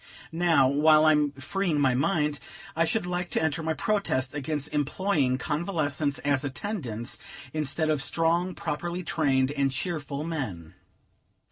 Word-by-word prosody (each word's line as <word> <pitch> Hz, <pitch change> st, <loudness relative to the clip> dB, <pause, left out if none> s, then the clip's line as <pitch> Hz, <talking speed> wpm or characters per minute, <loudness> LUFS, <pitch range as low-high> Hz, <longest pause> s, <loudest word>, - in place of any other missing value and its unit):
Now, 165 Hz, -5 st, +4 dB
while 155 Hz, +3 st, +5 dB
I'm 150 Hz, -2 st, +4 dB
freeing 155 Hz, +4 st, -1 dB
my 135 Hz, -3 st, +3 dB
mind, 150 Hz, +1 st, +1 dB, 0.4 s
I 165 Hz, +1 st, +3 dB
should 195 Hz, +5 st, 0 dB
like 180 Hz, 0 st, -2 dB
to -, -, 0 dB
enter 160 Hz, +1 st, 0 dB
my 160 Hz, 0 st, -1 dB
protest 175 Hz, -, 0 dB
against 150 Hz, 0 st, -3 dB
employing 145 Hz, -2 st, +1 dB
convalescents 150 Hz, -1 st, -1 dB
as 145 Hz, -1 st, +2 dB
attendants, 135 Hz, -, -4 dB, 0.3 s
instead 155 Hz, +1 st, 0 dB
of 150 Hz, -3 st, 0 dB
strong, 170 Hz, +4 st, +1 dB
properly 170 Hz, +3 st, -3 dB
trained, 135 Hz, -5 st, +1 dB
and 140 Hz, -2 st, +1 dB
cheerful 145 Hz, -1 st, -3 dB
men. 125 Hz, -, -4 dB
150 Hz, 135 wpm, -27 LUFS, 140-165 Hz, 0.4 s, while